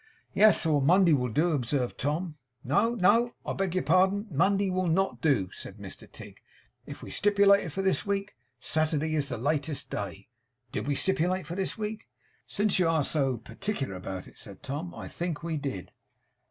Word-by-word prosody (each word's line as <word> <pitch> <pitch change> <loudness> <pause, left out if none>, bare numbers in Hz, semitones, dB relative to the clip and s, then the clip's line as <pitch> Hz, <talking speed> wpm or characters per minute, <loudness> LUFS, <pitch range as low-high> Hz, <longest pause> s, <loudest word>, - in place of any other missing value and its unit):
'Yes; 215 -3 +5
or 150 -3 +3
Monday 175 +4 +5
will 125 -3 +1
do,' 155 +10 +2
observed 130 -2 -1
Tom. 155 +4 -2 0.3
'No, 205 - +2
no, 230 +4 +3
I - - -2
beg 190 -2 -2
your 185 - +1
pardon. 190 +5 +3
Monday 195 +5 +2
will 185 0 0
NOT 190 +4 0
do,' 130 - +2
said - - -8
Mr - - -9
Tigg. - - -10 0.5
'If - - -9
we - - -8
stipulated 200 -3 +4
for 195 +5 -3
this 190 -1 +1
week, 200 0 -2 0.2
Saturday 155 +2 0
is 150 -2 0
the - - -3
latest 145 +3 -1
day. 100 -1 -5 0.4
Did - - -3
we 145 - +1
stipulate 185 +2 0
for 175 - -6
this 190 +4 -3
week?' 215 0 -5 0.4
'Since 205 -2 +1
you 180 - +3
are 160 -3 +2
so 135 -4 0
particular 120 - -4
about 90 0 -6
it,' - - -16
said 100 -2 -12
Tom, 150 +6 -4
'I - - -7
think 170 -2 -4
we 165 -1 -2
did. 135 -11 -5
165 Hz, 180 wpm, -28 LUFS, 140-195 Hz, 0.5 s, Yes